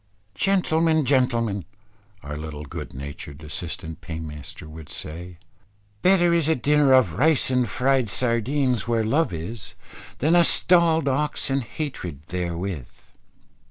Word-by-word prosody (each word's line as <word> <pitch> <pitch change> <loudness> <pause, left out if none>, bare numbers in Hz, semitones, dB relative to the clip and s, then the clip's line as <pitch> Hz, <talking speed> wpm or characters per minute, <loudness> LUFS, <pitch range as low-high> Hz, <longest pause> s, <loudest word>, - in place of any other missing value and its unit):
"Gentlemen, 160 - +2
gentlemen," 120 -7 +1 0.6
our 75 +1 -6
little 75 -1 -6
good - - -7
natured 70 +2 -8
assistant 80 +1 -6
paymaster 80 -3 -8
would 80 -1 -11
say; 85 +3 -4 0.6
"better 175 -2 +4
is 165 -3 +2
a 160 - +4
dinner 145 +1 +3
of 125 -12 +4
rice 150 -2 +4
and 125 -1 +1
fried 130 -3 +1
sardines, 125 +1 0
where 115 -1 +1
love 135 - +1
is, 90 +6 -6 0.4
than 155 +6 +2
a - - +7
stallëd 170 -2 +4
ox 140 +1 -1
and 135 +1 +1
hatred 105 - -6
therewith." 85 -4 -5
120 Hz, 125 wpm, -24 LUFS, -, 0.6 s, a